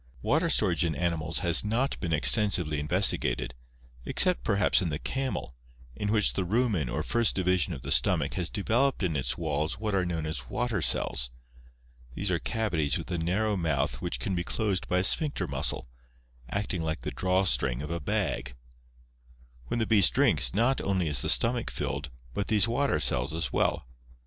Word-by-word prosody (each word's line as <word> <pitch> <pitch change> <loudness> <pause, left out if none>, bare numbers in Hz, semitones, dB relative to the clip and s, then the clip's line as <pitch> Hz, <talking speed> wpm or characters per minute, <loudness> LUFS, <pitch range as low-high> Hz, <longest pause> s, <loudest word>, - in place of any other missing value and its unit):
— 60 - -25
Water 165 +4 +1
storage 95 - +2
in 80 -3 -1
animals 85 0 -1
has 85 -1 +4
not 115 +6 -1
been 85 - -3
extensively 80 -2 +3
investigated, 75 -6 0 0.5
except - - +2
perhaps 100 +10 +3
in 90 - -1
the 75 - -3
camel, 130 - -3 0.4
in 105 +8 -2
which 105 -2 +2
the - - -1
rumen 100 - 0
or - - -2
first 120 -2 +2
division 90 -1 +1
of 70 -7 -7
the - - -5
stomach - - +3
has 85 -2 -1
developed 115 +4 0
in 85 -4 -1
its 65 - -2
walls 80 +1 -2
what 105 0 -3
are 95 -2 +1
known 85 -3 -3
as 75 -6 -5
water 120 -6 -2
cells. 60 -5 +1 0.9
These 100 -1 -2
are 85 - 0
cavities 80 - -1
with - - -7
a 90 - -2
narrow 100 +6 0
mouth 70 -8 -1
which 60 - -3
can 95 - -3
be 85 -1 -1
closed 100 -1 -2
by 90 - 0
a 90 - +2
sphincter 150 - +3
muscle, - - -2 0.6
acting 100 -1 -2
like 80 -5 -3
the - - -5
draw 95 +1 0
string 65 -7 0
of 75 - -6
a 85 - -2
bag. 65 -4 -2 1.1
When - - -2
the 115 - 0
beast 100 - +4
drinks, - - +4
not 120 +5 +2
only 95 -4 -1
is 70 -5 0
the - - -2
stomach 120 0 +2
filled, 75 0 -4 0.2
but 100 - -3
these 110 +1 +2
water 135 +4 0
cells 65 +6 0
as 80 -6 -3
well. - - 0
90 Hz, 185 wpm, -28 LUFS, 75-105 Hz, 1.1 s, has